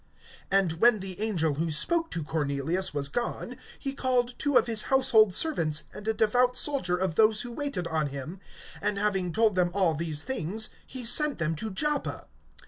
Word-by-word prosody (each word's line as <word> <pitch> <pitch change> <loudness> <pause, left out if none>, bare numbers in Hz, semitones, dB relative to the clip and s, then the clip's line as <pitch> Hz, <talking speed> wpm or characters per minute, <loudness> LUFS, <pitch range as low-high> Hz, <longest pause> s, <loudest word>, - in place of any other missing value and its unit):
(7)And 185 -4 +1
when 235 -1 +5
the 190 +1 -6
angel 170 -9 +1
who 160 +4 -2
spoke 325 - +2
to 165 - -4
Cornelius 150 +4 -1
was 145 -1 -2
gone, 240 - -4 0.2
he 275 -1 -4
called 250 -2 0
two 285 -3 +2
of - - +4
his 225 -2 0
household 255 -6 +4
servants, 160 - +2
and 210 +1 -9
a 220 - +2
devout 245 +3 +2
soldier 260 -12 0
of 185 -2 -1
those 215 +3 +3
who 245 - -7
waited 275 - -4
on 160 -2 -1
him; 140 +6 -7 0.4
(8)and 210 - 0
having 195 -3 0
told 220 +3 +2
them 180 -1 +1
all 185 -5 +2
these 155 -1 -3
things, 220 -4 -1 0.2
he 255 -2 -6
sent 295 +5 +2
them 165 -1 -1
to 220 +8 -5
Joppa. 295 +9 -2
200 Hz, 185 wpm, -27 LUFS, 165-245 Hz, 0.4 s, when